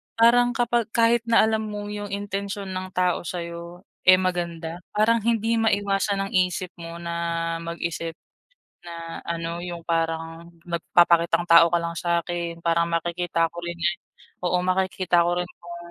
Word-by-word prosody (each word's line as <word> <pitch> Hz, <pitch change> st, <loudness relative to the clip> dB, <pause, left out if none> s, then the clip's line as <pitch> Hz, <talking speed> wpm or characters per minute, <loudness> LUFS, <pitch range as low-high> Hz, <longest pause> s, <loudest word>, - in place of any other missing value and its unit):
Parang 245 Hz, +2 st, +5 dB
kapag 240 Hz, -2 st, +1 dB
kahit 230 Hz, 0 st, +3 dB
na 230 Hz, 0 st, +5 dB
alam 220 Hz, 0 st, +1 dB
mo 205 Hz, -1 st, -5 dB
yung 205 Hz, 0 st, -5 dB
intensyon 200 Hz, 0 st, -4 dB
ng 185 Hz, 0 st, -5 dB
tao 180 Hz, -1 st, +1 dB
sayo, 170 Hz, +1 st, -6 dB, 0.2 s
eh, 185 Hz, -, +9 dB
maganda, 170 Hz, -2 st, -2 dB, 0.2 s
parang 225 Hz, +2 st, +4 dB
hindi 230 Hz, 0 st, +1 dB
maiwasan 200 Hz, -2 st, +1 dB
ng -, -, -12 dB
isip 180 Hz, 0 st, +1 dB
mo 170 Hz, 0 st, -8 dB
na 170 Hz, 0 st, -2 dB
mag-isip, 170 Hz, -1 st, -4 dB, 0.7 s
na 170 Hz, -1 st, -7 dB
ano, 170 Hz, 0 st, -3 dB
yung 175 Hz, -1 st, -6 dB
parang 165 Hz, 0 st, -2 dB, 0.2 s
magpapakitang 170 Hz, 0 st, +3 dB
tao 170 Hz, 0 st, +7 dB
ka 170 Hz, -, +3 dB
lang 170 Hz, 0 st, -4 dB
sakin 170 Hz, 0 st, -2 dB
parang 170 Hz, 0 st, +2 dB
makikita 170 Hz, 0 st, 0 dB
ko 175 Hz, -, -7 dB
ganyan 175 Hz, +1 st, -1 dB, 0.5 s
oo 180 Hz, 0 st, +2 dB
makikita 185 Hz, -1 st, +2 dB
ko 175 Hz, +1 st, +1 dB
rin 180 Hz, -, -1 dB
kung 175 Hz, 0 st, -9 dB
175 Hz, 145 wpm, -24 LUFS, 170-195 Hz, 0.7 s, eh